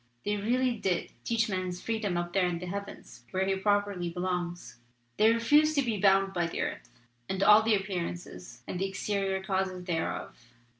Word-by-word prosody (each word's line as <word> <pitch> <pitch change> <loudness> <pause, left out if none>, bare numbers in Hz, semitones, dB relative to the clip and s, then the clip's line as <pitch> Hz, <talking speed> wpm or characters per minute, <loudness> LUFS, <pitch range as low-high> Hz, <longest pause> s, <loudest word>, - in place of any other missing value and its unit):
They 205 0 +1
really 245 +4 +1
did 185 -4 -1
teach 230 -1 +1
man's 185 -3 -3
freedom 215 -5 -2
up 175 0 -3
there 190 -2 +3
in 175 -1 -1
the 180 - -6
heavens 200 +2 -7
where 190 0 0
he 195 0 +1
properly 205 -2 0
belongs. 175 -8 -4 0.4
They 220 +1 +6
refused 295 +7 +4
to 280 - +3
be 225 -5 -1
bound 195 -1 +4
by 175 -2 0
the - - -5
earth, - - -4 0.4
and 190 0 0
all 210 +2 +8
the 220 0 +3
appearances 180 -2 -5
and 180 - -4
the 195 - 0
exterior 195 -1 -1
causes 190 -1 -1
thereof. 125 -8 -4
195 Hz, 180 wpm, -29 LUFS, 180-210 Hz, 0.4 s, all